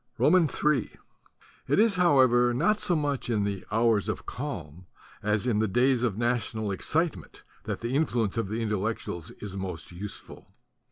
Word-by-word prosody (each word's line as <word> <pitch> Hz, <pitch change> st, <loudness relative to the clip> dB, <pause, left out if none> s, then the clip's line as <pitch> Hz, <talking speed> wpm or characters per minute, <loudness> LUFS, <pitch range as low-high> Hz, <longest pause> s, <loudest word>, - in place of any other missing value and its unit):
Ill 165 Hz, -, +5 dB
IT 150 Hz, -, +2 dB, 0.9 s
is 220 Hz, +1 st, +5 dB
however 130 Hz, -9 st, +4 dB
not 205 Hz, -, +2 dB
so 180 Hz, -5 st, +1 dB
much 145 Hz, -5 st, -1 dB
in 110 Hz, -3 st, +1 dB
the 100 Hz, -2 st, -3 dB
hours 110 Hz, -2 st, +2 dB
of -, -, -4 dB
calm 90 Hz, -, -6 dB, 0.3 s
as 105 Hz, +2 st, 0 dB
in 115 Hz, -4 st, +1 dB
the 110 Hz, -, +2 dB
days 125 Hz, +4 st, +2 dB
of 115 Hz, -5 st, 0 dB
national 115 Hz, -3 st, -1 dB
excitement 135 Hz, -, -2 dB, 0.2 s
that -, -, -4 dB
the 120 Hz, +3 st, -2 dB
influence 120 Hz, -9 st, +1 dB
of 115 Hz, -3 st, -1 dB
the 115 Hz, +2 st, -2 dB
Intellectuals 105 Hz, -5 st, -3 dB
is 100 Hz, -2 st, -6 dB
most 90 Hz, -5 st, -5 dB
useful. 95 Hz, +1 st, -8 dB
115 Hz, 155 wpm, -27 LUFS, 100-140 Hz, 0.9 s, Ill